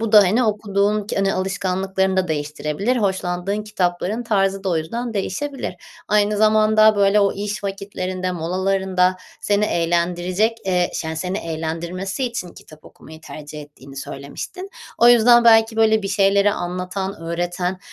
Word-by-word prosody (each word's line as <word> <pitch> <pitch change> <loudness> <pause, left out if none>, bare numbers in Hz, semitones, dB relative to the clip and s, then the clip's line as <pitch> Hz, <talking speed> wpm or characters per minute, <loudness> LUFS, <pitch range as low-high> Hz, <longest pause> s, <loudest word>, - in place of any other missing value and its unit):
bu 225 -1 -2
da, 210 - +9
hani, 215 +7 +2
okuduğun 210 -1 0
ki - - -4
hani, 195 0 +1
alışkanlıklarını 190 0 -1
da 185 -2 +1
değiştirebilir. 150 +9 -2
Hoşlandığın 190 0 -1
kitapların 195 +2 -2
tarzı 195 -4 0
da 190 - 0
o 170 - +1
yüzden 230 +9 -4
değişebilir. 265 +8 -3 0.3
Aynı 210 0 +2
zamanda, 215 0 +4
böyle, 200 +1 +4
o 200 -1 +2
iş 205 +1 -5
vakitlerinde, 185 -2 -4
molalarında 185 +1 0 0.2
seni 205 0 +1
eğlendirecek, 175 +5 0
eee, 180 -1 +1
şa 160 -1 -4
seni 185 +4 -3
eğlendirmesi 170 +7 -4
için 235 -7 -4
kitap 155 -2 -16
okumayı 160 0 -14
tercih 150 -1 -9
ettiğini 140 -2 -15
söylemiştin. 145 - -7 0.3
O 235 - +6
yüzden, 240 0 +6
belki, 225 -1 +5
böyle 220 -1 +3
bir 195 - -3
şeyleri 200 0 +3
anlatan, 185 +2 -4
öğreten, 175 +2 -3
195 Hz, 145 wpm, -21 LUFS, 175-210 Hz, 0.3 s, da